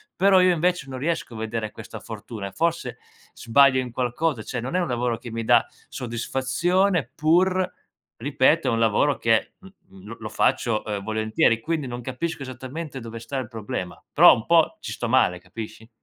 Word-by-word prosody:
però 190 -1 +5
io, 180 -1 +5
invece, 175 -3 0
non 130 -1 -6
riesco 160 -4 -2
a 110 - -8
vedere 110 -1 -3
questa - - -9
fortuna, 105 -4 -7
e - - -9
forse 170 - -2 0.3
sbaglio 130 +2 +4
in 125 -2 -4
qualcosa. 125 +1 -1
Cioè, 125 +1 -4
non 130 +9 -4
è - - +3
un 175 - 0
lavoro 120 -1 -1
che 120 - -9
mi 115 0 -3
dà 120 +1 +4 0.2
soddisfazione, 135 +9 0
pur 180 +4 +2 0.5
ripeto, - - +2
è - - +3
un 115 - +1
lavoro 115 +6 +2
che 115 -1 +1
m 190 - -14 0.2
mhmm, 95 +1 -15
lo 115 - -8
lo 110 - -6
faccio, 115 -1 +1
ehm, 100 -2 -3
volentieri. 110 +1 +1
Quindi, 155 0 -2
non 120 0 -6
capisco 135 +5 -4
esattamente 130 +3 -7
dove 115 -1 -8
sta 135 +4 -5
il 130 - -3
problema, 105 -6 -6
però - - +8
un 110 - -6
po' 170 - +3
ci - - -6
sto 120 - -4
male, 100 -8 +3
capisci? 110 +5 -9
125 Hz, 190 wpm, -24 LUFS, 115-160 Hz, 0.5 s, però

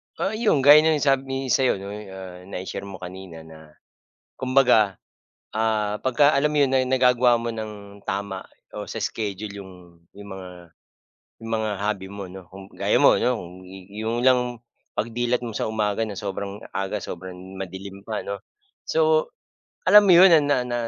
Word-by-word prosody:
Oo, 195 - -1
'yong 215 - +1
gaya 145 +2 +9
ng 155 -1 +2
sabi 135 -1 0
sa'yo 130 -2 +3
'di 95 - -9
ba 100 - -6 0.5
na 100 - -6
i-share 100 +1 -6
mo 100 - -8
kanina 90 -3 -9
na 80 -1 -15 0.6
kumbaga, 125 -6 +3 0.6
ah, 110 -1 0
pagka 145 +3 +3
alam 145 +1 +2
mo 150 - -2
'yon 135 - -2 0.2
nagagawa 125 -2 +4
mo 115 0 -3
ng 105 -2 -8
tama 100 -2 -3 0.3
o - - -7
sa - - -7
schedule 105 -1 -4
'yong, 95 -1 -11 0.4
'yong 100 0 -11
mga 95 -1 -9 0.9
'yong 115 - -6
mga 110 -1 -1
hobby 100 -2 -2
mo 100 -1 -7
'no, 95 0 -10
kung 95 0 -11
gaya - - 0
mo - - +7
'no, 125 -1 +1
kung 85 -3 -9 0.4
'yong 110 +3 -3
lang 130 -1 +5 0.6
pag-dilat 120 +2 -1
mo 115 - -6
sa - - -2
umaga, 105 0 -1
na 100 - -7
sobrang 100 0 -5 0.2
aga 95 +2 -2
sobrang 90 +1 -7 0.2
madilim 95 +1 -7
pa 110 -2 -3
'no. 100 0 -5 0.5
So, 485 0 +2 0.6
alam 210 0 +8
mo 185 - +7
'yon, 180 +1 +8
ah, 160 - +7
na 145 -1 +2
na 120 -1 -2
110 Hz, 170 wpm, -24 LUFS, 100-130 Hz, 0.9 s, gaya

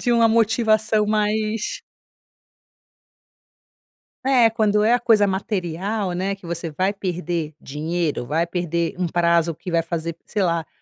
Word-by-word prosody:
de 245 - +1
uma 230 -1 +5
motivação 220 -1 +2
mais 215 +1 -1 2.4
É 250 -4 +5
quando 210 -1 +2
é 225 +3 +4
a - - +3
coisa 225 -3 +4
material, 190 0 -2
né, 190 +3 -1
que 195 -2 -14
você 170 0 -3
vai 185 +6 0
perder 175 -5 -3
dinheiro, 155 -1 -3
vai 160 +6 0
perder 170 -1 -2
um 180 - 0
prazo 170 -1 +2
que 180 - -8
vai 165 -1 +2
fazer, 165 0 -4
sei 210 -2 -2
lá, 170 -3 0
185 Hz, 140 wpm, -22 LUFS, 170-215 Hz, 2.4 s, uma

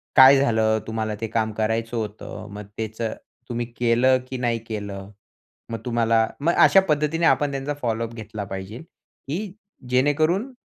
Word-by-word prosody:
काय 135 +1 +9
झालं? 110 -4 +2
तुम्हाला 110 -1 -2
ते 115 - -1
काम 110 0 -1
करायचं 110 +2 -1
होतं 105 -1 -6
मग 105 0 -7
तेचं 110 0 -3 0.4
तुम्ही 120 0 -2
केलं 125 +2 +4
की 130 - -4
नाही 120 -2 0
केलं? 100 -2 -6 0.6
मग 115 - -3
तुम्हाला 115 -2 +2
मग 165 +4 +2
अशा 195 - +7
पद्धतीने 150 +2 +1
आपण 145 -3 +3
त्यांचा 140 +2 -3
फॉलो 115 -1 -1
अप 115 - -13
घेतला 110 -2 -6
पाहिजे, 95 +4 -7
की 175 +4 -8 0.4
जेणेकरून 155 - +2
115 Hz, 150 wpm, -23 LUFS, 110-140 Hz, 0.6 s, काय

